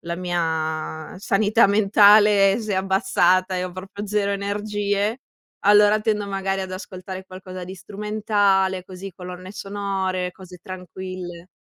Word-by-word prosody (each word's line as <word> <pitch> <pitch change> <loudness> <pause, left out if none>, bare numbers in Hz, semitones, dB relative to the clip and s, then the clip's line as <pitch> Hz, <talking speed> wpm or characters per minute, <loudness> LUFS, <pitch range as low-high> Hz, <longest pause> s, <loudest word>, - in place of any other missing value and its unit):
la 170 0 -4
mia 160 -3 -3
sanità 205 +2 +3
mentale 205 0 +5
si 215 -1 -5
è - - +1
abbassata 190 -1 +2
e 180 - -1
ho 180 - -6
proprio 195 +3 -7
0 200 0 0
energie, 205 +2 -1 0.5
allora 210 +1 +6
tendo 210 -2 -1
magari 195 0 -2
ad 190 -1 -5
ascoltare 185 0 -7
qualcosa 185 -1 -9
di 185 +2 -8
strumentale, 200 -2 0
così, 190 0 -8
colonne 180 +1 -9
sonore, 195 -2 -3
cose 185 -1 -13
tranquille. 185 -1 -8
195 Hz, 130 wpm, -23 LUFS, 185-205 Hz, 0.5 s, allora